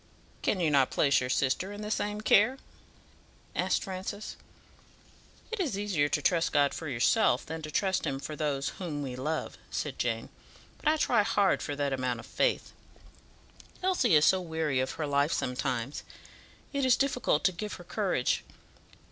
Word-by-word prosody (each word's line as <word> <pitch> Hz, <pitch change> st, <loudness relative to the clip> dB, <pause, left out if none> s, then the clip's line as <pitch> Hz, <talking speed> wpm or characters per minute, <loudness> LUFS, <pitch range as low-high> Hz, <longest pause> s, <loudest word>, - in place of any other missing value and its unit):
"Can 195 Hz, -, +1 dB
you 165 Hz, -4 st, +2 dB
not 135 Hz, -3 st, +4 dB
place 140 Hz, -2 st, +3 dB
your 125 Hz, -, -3 dB
sister 140 Hz, +9 st, 0 dB
in 205 Hz, +1 st, -7 dB
the 210 Hz, -, -4 dB
same 210 Hz, 0 st, -1 dB
care?" 215 Hz, +4 st, +4 dB, 1.0 s
asked -, -, +1 dB
Francis. 190 Hz, +2 st, -5 dB, 1.2 s
"It 455 Hz, -, -3 dB
is 290 Hz, -, -1 dB
easier 185 Hz, -8 st, +1 dB
to 150 Hz, -1 st, 0 dB
trust 165 Hz, 0 st, +2 dB
God 145 Hz, -1 st, +3 dB
for 160 Hz, -, -5 dB
yourself 135 Hz, -, +2 dB
than 160 Hz, 0 st, -5 dB
to 155 Hz, -, -6 dB
trust 190 Hz, +4 st, 0 dB
Him 135 Hz, -, -1 dB
for 150 Hz, +3 st, -6 dB
those 145 Hz, -3 st, -1 dB
whom 155 Hz, -6 st, -3 dB
we 130 Hz, -2 st, -5 dB
love," 150 Hz, +5 st, -3 dB
said -, -, -4 dB
Jane; -, -, -1 dB, 0.5 s
"but -, -, -5 dB
I 310 Hz, +1 st, +4 dB
try 295 Hz, -, +3 dB
hard 205 Hz, -2 st, +2 dB
for 145 Hz, -, -3 dB
that 140 Hz, -1 st, -1 dB
amount 130 Hz, -2 st, -1 dB
of 115 Hz, -, -9 dB
faith. -, -, 0 dB, 1.1 s
Elsie 310 Hz, -, +3 dB
is 150 Hz, +1 st, +6 dB
so 190 Hz, -, +4 dB
weary 160 Hz, -5 st, -1 dB
of 130 Hz, 0 st, -1 dB
her 155 Hz, -, -3 dB
life 145 Hz, +1 st, +2 dB
sometimes, 125 Hz, 0 st, -2 dB, 0.7 s
it 280 Hz, -1 st, 0 dB
is 255 Hz, -1 st, +5 dB
difficult 250 Hz, -, +1 dB
to 185 Hz, -, +4 dB
give 205 Hz, +4 st, -5 dB
her 175 Hz, -, -8 dB
courage. 180 Hz, -, 0 dB
160 Hz, 175 wpm, -29 LUFS, 140-205 Hz, 1.2 s, is